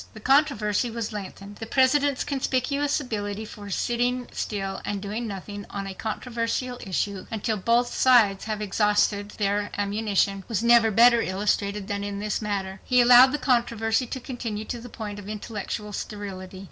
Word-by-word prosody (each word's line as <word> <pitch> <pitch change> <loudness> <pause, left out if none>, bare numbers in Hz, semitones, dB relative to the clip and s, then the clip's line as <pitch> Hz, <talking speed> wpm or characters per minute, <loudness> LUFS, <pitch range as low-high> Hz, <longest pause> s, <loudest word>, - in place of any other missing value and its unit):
The - - -8
controversy 245 -4 +2
was 225 -2 -4
lengthened. 200 0 -8
The 225 - -7
President's 275 +2 +3
conspicuous 280 +1 0
ability 215 -5 -4
for 205 -1 -10
sitting 245 +4 -1
still 195 -2 -4
and 205 -1 -3
doing 210 +4 -4
nothing 205 0 -7
on 200 -1 -5
a 195 - -5
controversial 235 +3 -3
issue 195 0 -2
until 220 0 -2
both 235 +4 +1
sides 225 -7 +4
have 215 -1 -3
exhausted 205 0 +1
their 205 0 0
ammunition 200 -1 0
was 225 -2 -1
never 235 -1 +6
better 235 +2 +6
illustrated 200 +1 -1
than 200 0 -3
in 200 0 -4
this 210 +1 -2
matter. 195 -2 -3
He 250 -1 +3
allowed 245 +2 +8
the 295 - 0
controversy 235 -2 +1
to 260 - -5
continue 230 -4 -5
to 240 - -5
the 245 - -10
point 210 -2 -6
of 205 0 -9
intellectual 210 0 -5
sterility. 195 -3 -6
215 Hz, 160 wpm, -25 LUFS, 205-240 Hz, -, allowed